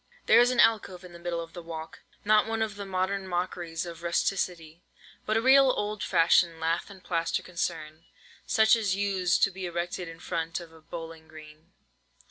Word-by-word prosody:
There -, -, +6 dB
was 245 Hz, +1 st, +5 dB
an 250 Hz, -1 st, -1 dB
alcove 200 Hz, -6 st, +3 dB
in 180 Hz, -1 st, -12 dB
the 170 Hz, -, -11 dB
middle 170 Hz, -1 st, -3 dB
of 165 Hz, -1 st, -10 dB
the 175 Hz, -, -8 dB
walk—not 170 Hz, +6 st, -1 dB
one 225 Hz, 0 st, -1 dB
of 215 Hz, -2 st, -4 dB
the 200 Hz, -1 st, -7 dB
modern 190 Hz, +1 st, -2 dB
mockeries 175 Hz, -2 st, -3 dB
of 170 Hz, -1 st, -9 dB
rusticity—but 170 Hz, +3 st, -3 dB
a -, -, +2 dB
real 270 Hz, +1 st, +6 dB
old 210 Hz, -4 st, -2 dB
fashioned 170 Hz, -2 st, +3 dB
lath 165 Hz, +4 st, -1 dB
and 195 Hz, -2 st, -13 dB
plaster 165 Hz, -1 st, -1 dB
concern, 165 Hz, -2 st, -5 dB, 0.4 s
such 220 Hz, +1 st, +5 dB
as 205 Hz, -5 st, 0 dB
used 195 Hz, -3 st, +1 dB
to 200 Hz, -, +4 dB
be 185 Hz, -1 st, -5 dB
erected 175 Hz, +1 st, -4 dB
in 165 Hz, 0 st, -10 dB
front 165 Hz, -1 st, -3 dB
of 170 Hz, -2 st, -12 dB
a 160 Hz, -, -16 dB
bowling 165 Hz, 0 st, -9 dB
green. 155 Hz, +2 st, -15 dB
175 Hz, 180 wpm, -28 LUFS, 165-200 Hz, 0.4 s, There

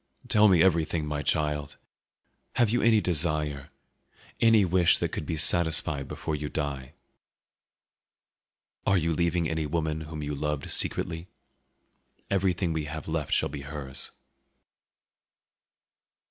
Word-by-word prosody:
"Tell 105 Hz, 0 st, +5 dB
me 90 Hz, -4 st, +5 dB
everything, 85 Hz, -3 st, +1 dB
my 75 Hz, -1 st, -3 dB
child; 75 Hz, 0 st, -1 dB, 0.8 s
have 115 Hz, -3 st, +2 dB
you 120 Hz, -, +1 dB
any 110 Hz, -2 st, +4 dB
desire, 75 Hz, -5 st, 0 dB, 0.7 s
any 115 Hz, -3 st, +5 dB
wish 90 Hz, -1 st, +3 dB
that -, -, -2 dB
could 75 Hz, -, -5 dB
be 80 Hz, -, -2 dB
satisfied 75 Hz, -3 st, +2 dB
before 80 Hz, -, -4 dB
you 75 Hz, 0 st, -5 dB
die? 70 Hz, -4 st, -4 dB, 1.9 s
Are 95 Hz, -, +2 dB
you 85 Hz, -1 st, 0 dB
leaving 85 Hz, 0 st, 0 dB
any 80 Hz, -1 st, -2 dB
woman 80 Hz, 0 st, -2 dB
whom 75 Hz, -1 st, -7 dB
you 75 Hz, 0 st, -4 dB
loved 75 Hz, 0 st, -3 dB
secretly? 80 Hz, +2 st, +2 dB, 1.0 s
Everything 90 Hz, -3 st, 0 dB
we 80 Hz, -2 st, -3 dB
have 75 Hz, 0 st, -7 dB
left 80 Hz, -3 st, -3 dB
shall -, -, +1 dB
be 70 Hz, 0 st, -7 dB
hers." 70 Hz, -1 st, -2 dB
80 Hz, 125 wpm, -27 LUFS, 75-85 Hz, 1.9 s, Tell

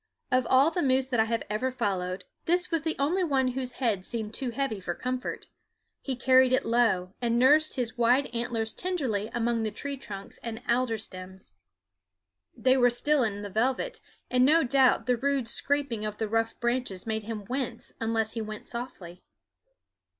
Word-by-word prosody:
Of 255 Hz, -1 st, +2 dB
all 270 Hz, +5 st, +5 dB
the 355 Hz, -, -1 dB
moose 265 Hz, -2 st, +3 dB
that 245 Hz, -3 st, 0 dB
I 220 Hz, -, +5 dB
have 230 Hz, 0 st, -1 dB
ever 215 Hz, +5 st, -1 dB
followed, 185 Hz, -6 st, -2 dB, 0.2 s
this 355 Hz, +2 st, +2 dB
was 330 Hz, -2 st, +1 dB
the 320 Hz, +1 st, -2 dB
only 335 Hz, +7 st, +1 dB
one 270 Hz, -6 st, +2 dB
whose 255 Hz, 0 st, -3 dB
head 225 Hz, -8 st, 0 dB
seemed 220 Hz, 0 st, -4 dB
too 260 Hz, 0 st, -1 dB
heavy 240 Hz, -3 st, -2 dB
for 175 Hz, -2 st, -4 dB
comfort. 255 Hz, 0 st, -4 dB, 0.6 s
He 265 Hz, -, -3 dB
carried 260 Hz, +1 st, +5 dB
it 260 Hz, -, +2 dB
low, 220 Hz, -6 st, +2 dB
and 235 Hz, -1 st, +1 dB
nursed 295 Hz, +5 st, +4 dB
his 240 Hz, -3 st, -3 dB
wide 245 Hz, +4 st, +4 dB
antlers 230 Hz, -2 st, -2 dB
tenderly 260 Hz, -, -2 dB
among 235 Hz, 0 st, 0 dB
the 220 Hz, -, 0 dB
tree 280 Hz, +6 st, -5 dB
trunks 200 Hz, -6 st, -9 dB
and 230 Hz, 0 st, -6 dB
alder 235 Hz, -1 st, +1 dB
stems. 190 Hz, -2 st, -8 dB, 1.1 s
They 260 Hz, 0 st, +3 dB
were 245 Hz, -1 st, +5 dB
still 275 Hz, +3 st, +2 dB
in 205 Hz, -2 st, -2 dB
the 205 Hz, -, -6 dB
velvet, 260 Hz, -, -1 dB, 0.3 s
and 250 Hz, 0 st, +3 dB
no 315 Hz, +5 st, +5 dB
doubt 260 Hz, -3 st, +3 dB
the 250 Hz, 0 st, +2 dB
rude 275 Hz, -1 st, 0 dB
scraping 275 Hz, -3 st, 0 dB
of 210 Hz, -1 st, -4 dB
the 220 Hz, -, -1 dB
rough 225 Hz, +1 st, -1 dB
branches 240 Hz, -6 st, -1 dB
made 220 Hz, -1 st, -1 dB
him 215 Hz, -2 st, -5 dB
wince 250 Hz, -3 st, -4 dB
unless 225 Hz, -1 st, 0 dB
he 225 Hz, -, -3 dB
went 215 Hz, 0 st, -6 dB
softly. 190 Hz, -8 st, -6 dB
240 Hz, 180 wpm, -28 LUFS, 220-265 Hz, 1.1 s, all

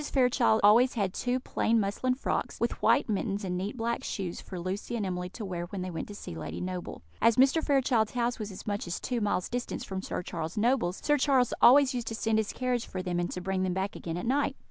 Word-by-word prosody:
Fairchild 250 Hz, -4 st, +3 dB
always 235 Hz, +5 st, +6 dB
had 195 Hz, -5 st, 0 dB
two 250 Hz, +1 st, -1 dB
plain 230 Hz, -2 st, +1 dB
muslin 215 Hz, +5 st, 0 dB
frocks, 265 Hz, -, -2 dB
with -, -, +1 dB
white -, -, +4 dB
mittens 205 Hz, -1 st, -1 dB
and 180 Hz, -2 st, -2 dB
neat 195 Hz, +6 st, -3 dB
black 235 Hz, 0 st, -1 dB
shoes, 180 Hz, -4 st, -4 dB
for 185 Hz, -, -7 dB
Lucy 190 Hz, +6 st, -4 dB
and 215 Hz, -4 st, -1 dB
Emily 180 Hz, -1 st, -3 dB
to 215 Hz, +3 st, -7 dB
wear 175 Hz, -2 st, -4 dB
when 185 Hz, 0 st, -5 dB
they 185 Hz, -, -4 dB
went 165 Hz, -, -5 dB
to 205 Hz, -, -9 dB
see 145 Hz, -, -8 dB
Lady 80 Hz, -, -6 dB
Noble. 180 Hz, -, -5 dB, 0.2 s
As 230 Hz, 0 st, +5 dB
Mr. 270 Hz, +5 st, +4 dB
Fairchild's 260 Hz, -6 st, +2 dB
house 240 Hz, -1 st, 0 dB
was 210 Hz, -1 st, -4 dB
as 190 Hz, -, -9 dB
much 205 Hz, -3 st, -2 dB
as 175 Hz, -, -3 dB
two 245 Hz, -3 st, -2 dB
miles 205 Hz, -3 st, 0 dB
distance 245 Hz, 0 st, -4 dB
from 190 Hz, -1 st, -4 dB
Sir 180 Hz, -, -4 dB
Charles 165 Hz, +3 st, -5 dB
Noble's, 210 Hz, -5 st, +1 dB
Sir 295 Hz, -1 st, +3 dB
Charles 260 Hz, -3 st, +3 dB
always 270 Hz, +2 st, +7 dB
used 240 Hz, -2 st, -3 dB
to 225 Hz, -, -3 dB
send 220 Hz, 0 st, +1 dB
his 215 Hz, -, -1 dB
carriage 250 Hz, -2 st, -1 dB
for 185 Hz, -1 st, -5 dB
them, 175 Hz, -1 st, -1 dB
and 175 Hz, -, -1 dB
to 180 Hz, -, -5 dB
bring 190 Hz, 0 st, -1 dB
them 185 Hz, -1 st, 0 dB
back 190 Hz, +1 st, -2 dB
again 165 Hz, 0 st, -5 dB
at 180 Hz, -, -4 dB
night. 275 Hz, +4 st, +1 dB
210 Hz, 245 wpm, -29 LUFS, 185-245 Hz, 0.2 s, always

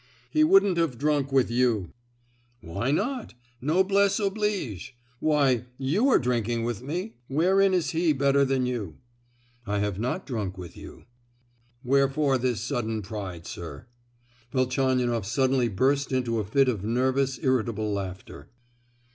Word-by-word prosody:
"He 310 Hz, -, +4 dB
wouldn't 310 Hz, -, +5 dB
have 155 Hz, -8 st, 0 dB
drunk 145 Hz, -1 st, 0 dB
with 130 Hz, -3 st, +2 dB
you!" 120 Hz, -7 st, +1 dB, 0.7 s
"Why 100 Hz, +8 st, -3 dB
not? 225 Hz, -, -1 dB, 0.3 s
Noblesse 190 Hz, -, +2 dB
oblige? 195 Hz, -, -2 dB, 0.2 s
Why, 140 Hz, -6 st, +2 dB
you 170 Hz, -, +1 dB
are -, -, +6 dB
drinking 120 Hz, -2 st, -1 dB
with 120 Hz, -1 st, -3 dB
me. 175 Hz, -, -5 dB
Wherein 190 Hz, +6 st, +3 dB
is 175 Hz, -3 st, 0 dB
he 165 Hz, 0 st, +2 dB
better 140 Hz, 0 st, +3 dB
than 135 Hz, -1 st, +1 dB
you?" 115 Hz, -10 st, -3 dB, 0.7 s
"I 100 Hz, 0 st, 0 dB
have 100 Hz, -1 st, -1 dB
not 125 Hz, -, -2 dB
drunk 105 Hz, -7 st, -4 dB
with 90 Hz, -2 st, -9 dB
you." -, -, -12 dB, 0.8 s
"Wherefore 135 Hz, +1 st, +2 dB
this 120 Hz, -4 st, -1 dB
sudden 110 Hz, -2 st, -2 dB
pride, 95 Hz, -5 st, -6 dB
sir?" 85 Hz, +6 st, -8 dB, 0.7 s
Velchaninoff 130 Hz, -4 st, +1 dB
suddenly 130 Hz, +1 st, +2 dB
burst 135 Hz, +8 st, +1 dB
into 120 Hz, -3 st, 0 dB
a -, -, -1 dB
fit 135 Hz, +7 st, +3 dB
of 110 Hz, -7 st, -1 dB
nervous, 130 Hz, +4 st, +1 dB
irritable 115 Hz, -5 st, 0 dB
laughter. 95 Hz, -6 st, -6 dB
130 Hz, 135 wpm, -26 LUFS, 115-150 Hz, 0.8 s, are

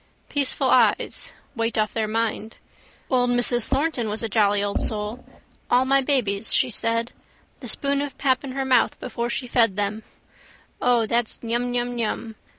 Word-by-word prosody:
Peaceful 280 Hz, -2 st, +1 dB
eyes. -, -, +2 dB, 0.2 s
Weight 230 Hz, -1 st, -1 dB
off 215 Hz, -1 st, 0 dB
their 220 Hz, -1 st, -1 dB
mind. 225 Hz, 0 st, -2 dB, 0.5 s
Old 250 Hz, -1 st, +3 dB
Mrs 245 Hz, -1 st, +2 dB
Thornton 270 Hz, -4 st, -1 dB
was 215 Hz, +2 st, -2 dB
a -, -, 0 dB
jolly 205 Hz, -1 st, +2 dB
old 205 Hz, 0 st, -1 dB
soul. 215 Hz, +3 st, -2 dB, 0.5 s
All 250 Hz, +1 st, +4 dB
my 275 Hz, +1 st, +3 dB
babies, 230 Hz, -7 st, 0 dB
she 250 Hz, -, +3 dB
said. 230 Hz, +1 st, -1 dB, 0.5 s
The -, -, -8 dB
spoon 280 Hz, -1 st, +3 dB
of 285 Hz, -2 st, -5 dB
pap 260 Hz, -2 st, +1 dB
in 265 Hz, -2 st, -6 dB
her 270 Hz, 0 st, -2 dB
mouth 255 Hz, -3 st, +2 dB
before 235 Hz, 0 st, -4 dB
she 250 Hz, +2 st, -2 dB
fed 230 Hz, -5 st, +2 dB
them. 205 Hz, +1 st, -2 dB, 0.8 s
O, 245 Hz, -2 st, +3 dB
that's 235 Hz, +1 st, -1 dB
nyumnyum. 240 Hz, -1 st, -2 dB
235 Hz, 155 wpm, -23 LUFS, 220-255 Hz, 0.8 s, All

